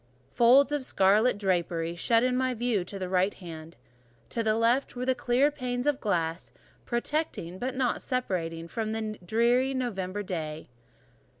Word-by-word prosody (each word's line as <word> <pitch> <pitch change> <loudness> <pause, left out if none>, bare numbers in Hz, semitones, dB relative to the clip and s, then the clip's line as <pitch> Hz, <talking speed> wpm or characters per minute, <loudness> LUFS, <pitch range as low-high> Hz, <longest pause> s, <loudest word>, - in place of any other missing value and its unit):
Folds 260 +4 +5
of 295 -2 -1
scarlet 210 +2 +3
drapery 170 -4 -1
shut 230 +7 +2
in 255 0 +1
my 255 0 0
view 230 -4 0
to 195 +3 -7
the 185 -1 -4
right 185 +2 +1
hand; 165 -3 -10 0.5
to 230 - -2
the 215 -1 +1
left 235 +5 +1
were 250 +1 -3
the 260 - +3
clear 255 +3 +2
panes 250 -3 -3
of 295 -2 +1
glass, 170 -5 -1 0.4
protecting, 240 - -2
but 260 +1 -3
not 255 -2 0
separating 175 -10 -2
me - - -9
from 220 +3 -3
the 215 -1 -4
drear 240 +7 +2
November 205 -6 -3
day. 160 -5 -5
225 Hz, 165 wpm, -28 LUFS, 180-250 Hz, 0.5 s, Folds